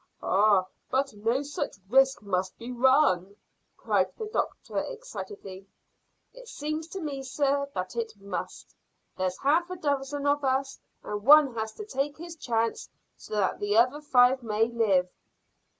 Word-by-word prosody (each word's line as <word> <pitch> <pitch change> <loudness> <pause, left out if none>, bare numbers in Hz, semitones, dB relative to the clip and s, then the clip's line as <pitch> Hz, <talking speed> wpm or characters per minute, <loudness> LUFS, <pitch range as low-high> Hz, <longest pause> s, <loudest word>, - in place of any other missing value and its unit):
"Oh, 200 -1 +4 0.2
but 275 0 0
no 225 +6 0
such 290 0 -4
risk 270 +2 +3
must 185 -2 -2
be 235 +2 -7
run," 245 - +3 0.4
cried - - +1
the 440 - -4
doctor 425 - -2
excitedly. 415 - -8 0.7
"It - - -13
seems 310 -5 -4
to 385 +3 -6
me, 290 -5 -4
sir, 280 +1 0
that 185 +3 -4
it 230 -2 -3
must. 200 0 -6 0.4
There's 185 -1 -2
half 325 +6 +2
a 365 - -4
dozen 285 -2 -2
of 290 0 +2
us, 270 +1 0 0.2
and 210 0 -4
one 290 0 +7
has 220 -1 -4
to 425 - -8
take 290 -7 -2
his 340 +1 -8
chance 230 -6 -1 0.3
so - - -8
that 200 -3 0
the 205 +1 +1
other 255 +6 +3
five 260 -2 +4
may 225 0 +1
live." 205 -6 +2
265 Hz, 150 wpm, -28 LUFS, 215-290 Hz, 0.7 s, one